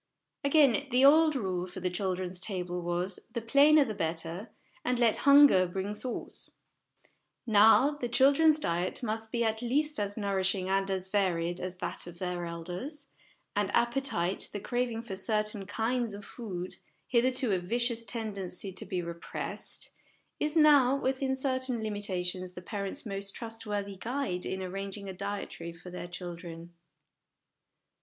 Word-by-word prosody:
Again, 280 -1 +4
the 255 +2 +5
old 310 +1 +6
rule 185 -7 -2
for 180 - -8
the 180 0 -1
children's 185 -1 -2
table 180 -2 -3
was, 175 +2 -2
' - - -34
the - - +1
plainer 280 +6 +5
the 220 - -3
better, 165 +3 -3 0.3
and 250 0 +1
let 235 -3 +4
hunger 280 -11 +8
bring 190 +3 -3
sauce 245 +3 -4 0.5
'; - - -35 0.2
now, 225 +5 +6
the 290 -5 -4
children's 285 +5 +5
diet 180 - -1
must 220 -1 -3
be 235 -1 +1
at 220 0 0
least 295 +4 0
as 205 +1 -2
nourishing 195 -2 0
and 195 0 +1
as 190 -1 -2
varied 175 -4 0
as 185 0 -5
that 180 - -4
of 175 -1 -10
their 180 -1 -3
elders; 180 - -6 0.5
and - - +1
appetite, 235 -8 +1
the 205 - -4
craving 240 +1 -2
for 210 -5 -5
certain 210 0 0
kinds 230 +1 -1
of 200 0 -9
food, 185 -7 -6 0.3
hitherto 255 0 +2
a 190 - +2
vicious 235 +5 0
tendency 200 -5 -4
to - - -6
be 180 -1 -2
repressed, 170 0 -5 0.5
is 305 +2 0
now 285 -4 +6
within 265 0 0
certain 260 -2 -1
limita 205 -4 -2
tions 180 0 -4
the 180 - -8
parents' 200 +7 -5
most 195 -1 -2
trustworthy 210 -4 -5
guide 235 -5 -2
in 190 0 -3
arranging 195 +2 -5
a 190 - -5
dietary 195 -3 -5
for 175 +2 -11
their 180 0 -6
children. 175 -1 -8
205 Hz, 155 wpm, -30 LUFS, 180-245 Hz, 0.5 s, hunger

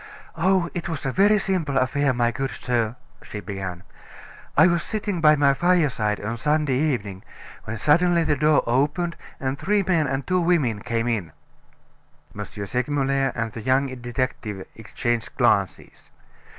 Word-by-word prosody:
"Oh, 185 +1 +2
it 175 -1 -4
was 160 -5 -4
a 135 - 0
very 205 +7 +4
simple 175 -9 -1
affair, 140 +2 +2
my 120 -1 +1
good 135 +3 -3
sir," 120 -3 -1 0.3
she 105 - -7
began. 95 -3 -6 0.7
"I - - +8
was 170 -2 +2
sitting 205 -5 -3
by 155 -1 +6
my 140 -1 +4
fireside 140 -11 +1
on 115 +3 -4
Sunday 150 +2 +1
evening, 105 -11 -1 0.4
when 115 +2 -4
suddenly 170 - +3
the 155 -2 +1
door 150 +1 +3
opened, 145 +8 0 0.2
and 135 +1 -3
three 205 0 +1
men 165 -6 +1
and 135 0 -2
two 185 0 +1
women 155 -11 +1
came 115 +2 -2
in." 105 -9 -2 1.0
M. - - -4
Segmuller 135 +5 -1
and 115 -1 -2
the 115 - -7
young 130 +2 +1
detective 120 -5 -3
exchanged 115 +1 -3
glances. - - 0
135 Hz, 150 wpm, -23 LUFS, 115-165 Hz, 1.0 s, I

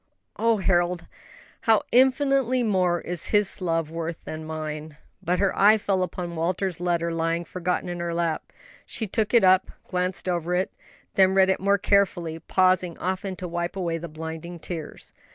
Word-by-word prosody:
'" - - -52
"And 225 - -4
oh, 230 -1 +4
Harold, 175 -2 +1 0.6
how 225 -2 +4
infinitely 260 0 +3
more 185 -5 +1
is 175 -1 -3
His 205 -2 +1
love 165 -3 -1
worth 165 0 -4
than 155 0 -6
mine!" 155 -1 -6 0.2
But 180 +2 0
her 195 +1 +1
eye 210 +2 +6
fell 195 -3 0
upon 180 -1 -3
Walter's 175 +2 -1
letter 170 -1 0
lying 165 +1 -1
forgotten 180 0 -2
in 175 0 -4
her 170 0 -2
lap. 170 -1 -2 0.4
She 225 - -3
took 215 +1 -1
it 235 -3 +5
up, 185 0 +5
glanced 180 0 -2
over 175 0 0
it, 185 +1 0 0.4
then 190 0 +4
read 190 0 +5
it - - 0
more 200 +1 +3
carefully, 175 -5 +1
pausing 185 0 +2
often 190 +1 -3
to 180 - -6
wipe 175 +2 -3
away 170 -3 -2
the 170 +1 -7
blinding 160 +2 -7
tears. 165 -2 -7
180 Hz, 175 wpm, -25 LUFS, 170-195 Hz, 0.6 s, eye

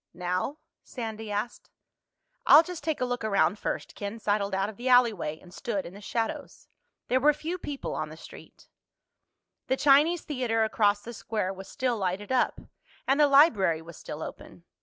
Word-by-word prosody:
"Now?" 180 +10 -2 0.2
Sandy 220 -3 -6
asked. 210 +4 -4 0.8
"I'll 310 - +9
just 360 -1 -8
take 315 -4 -2
a - - +2
look 245 -2 -3
around 205 -1 +2
first." - - -4
Ken 205 +2 -6
sidled 205 -3 0
out 195 +1 0
of 215 - -8
the 250 +2 -2
alleyway 220 -11 +3
and 180 -1 -16
stood 205 -3 -3
in 175 - -9
the 200 - -12
shadows. 225 +2 -4 0.4
There 255 - +2
were 295 +3 +5
few 330 +5 -5
people 285 -5 -5
on - - -3
the - - -11
street. - - -14 1.0
The 265 - +1
Chinese 300 +5 +4
Theater 245 -6 0
across 205 -2 +2
the 235 - -8
square 210 -3 -3
was 190 0 -10
still 250 -3 -1
lighted 190 +4 -2
up, 255 -1 +1 0.5
and 270 +2 +3
the 295 - +6
library 225 - +5
was 170 0 -11
still 155 0 -7
open. 170 - -10
225 Hz, 180 wpm, -28 LUFS, 200-265 Hz, 1.0 s, I'll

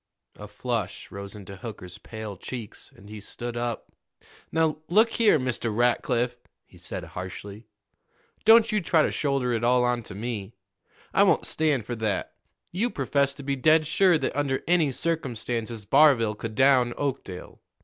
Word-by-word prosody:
A 105 - -10
flush 105 -1 -4
rose 100 +1 -8
into 100 -1 -10
Hooker's 95 -4 -9
pale 110 -3 -7
cheeks, 115 +3 -8
and 100 - -16
he 105 0 -8
stood 120 +3 -7
up. 120 -1 -4 0.6
"Now, 160 -2 +1
look 215 +6 +5
here, 220 -8 +4
Mr. 130 -3 -2
Rackliff," 120 +1 +1 0.3
he - - -19
said - - -6
harshly, 100 +4 -8 0.8
"don't 225 0 +6
you 210 -1 +1
try 165 -2 +3
to - - 0
shoulder 135 -4 0
it 115 0 -1
all 125 +1 +4
on 125 -1 +1
to 100 - -10
me. 110 -1 -5 0.6
I - - +4
won't - - +4
stand 150 -8 0
for 120 - -4
that. 110 -3 -2 0.4
You 215 +8 0
professed 140 - 0
to 140 - -8
be 140 0 -1
dead 155 +4 +4
sure 175 +3 +4
that - - -3
under 140 -2 -1
any 165 -5 +3
circumstances 120 -8 -3
Barville 135 -5 +5
could 110 +1 -7
down 130 -2 +4
Oakdale. 135 -10 -5
125 Hz, 160 wpm, -26 LUFS, 110-145 Hz, 0.8 s, don't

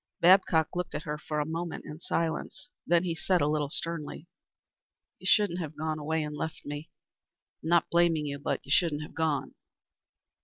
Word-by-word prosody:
Babcock 170 -3 +5
looked 180 -1 -2
at - - -3
her 150 -3 -4
for 150 0 -3
a 150 - +1
moment 165 +1 -4
in 150 - -8
silence, 170 +3 -2 0.2
then 175 0 +4
he 175 -2 -1
said, 180 +3 +1
a 145 - +2
little 150 -1 0
sternly, 165 0 -4 0.9
"You - - -6
shouldn't 205 -5 +4
have 155 -3 -5
gone 155 0 -2
away 160 +1 0
and 150 0 -4
left 160 +2 -5
me. 145 +2 -6 0.7
I'm 160 - -4
not 170 -1 +4
blaming 170 -3 +3
you, 140 -1 -4
but - - -1
you 140 - -8
shouldn't 155 -2 +3
have - - -10
gone." 160 -3 0
160 Hz, 185 wpm, -29 LUFS, 150-170 Hz, 0.9 s, Babcock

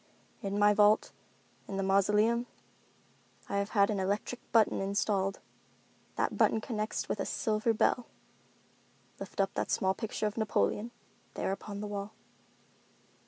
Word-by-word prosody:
"In 200 0 -2
my 205 0 +5
vault—in 205 -1 0
the 195 - 0
mausoleum, 210 +5 +3 1.0
I 200 - -2
have 200 +1 -2
had 200 +1 +5
an 205 - -1
electric 205 +6 -2
button 225 -4 +3
installed. 195 0 0 0.8
That - - 0
button 220 - +3
connects 215 -1 -3
with - - -2
a - - -1
silver 220 -2 0
bell. 230 +2 +1 1.1
Lift - - -9
up 195 0 +2
that - - -2
small 190 0 +2
picture 220 0 -3
of 210 +1 -2
Napoleon, 215 - 0 0.5
there - - -1
upon 200 +1 -5
the 210 - -4
wall." 205 0 -5
205 Hz, 135 wpm, -31 LUFS, 195-215 Hz, 1.1 s, my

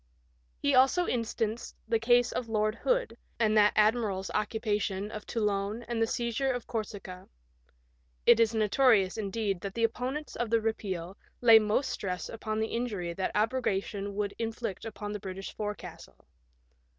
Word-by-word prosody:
He 285 - +1
also 270 +7 +5
instanced 230 -2 -2
the 225 0 +2
case 240 +1 +4
of 240 -2 -3
Lord 215 -1 +1
Hood, - - 0 0.2
and 215 -2 +3
that 210 -1 +5
admiral's 210 -3 +2
occupation 210 -2 -1
of 215 -1 -7
Toulon 210 0 -1
and 225 -1 -1
seizure 240 +3 0
of 245 -2 -4
Corsica. 205 -5 -6 1.0
It 235 -1 +7
is 230 0 +3
notorious, 215 -2 +4
indeed, 205 -3 -2
that 200 -1 -5
the 230 - 0
opponents 255 +6 -2
of 240 -1 -2
the 230 0 +3
repeal 195 -5 -3 0.2
lay 230 -2 +8
most 215 +6 0
stress 180 -2 -4
upon 215 -1 -3
the 220 - -1
injury 205 -8 -2
that 190 +2 -1
abrogation 205 -3 -1
would 205 -1 -1
in 225 -1 -1
flict 225 -4 -5
upon 210 -1 -6
the 210 - -4
British 190 0 -7
forecastle. 205 - -7
220 Hz, 150 wpm, -30 LUFS, 200-235 Hz, 1.0 s, lay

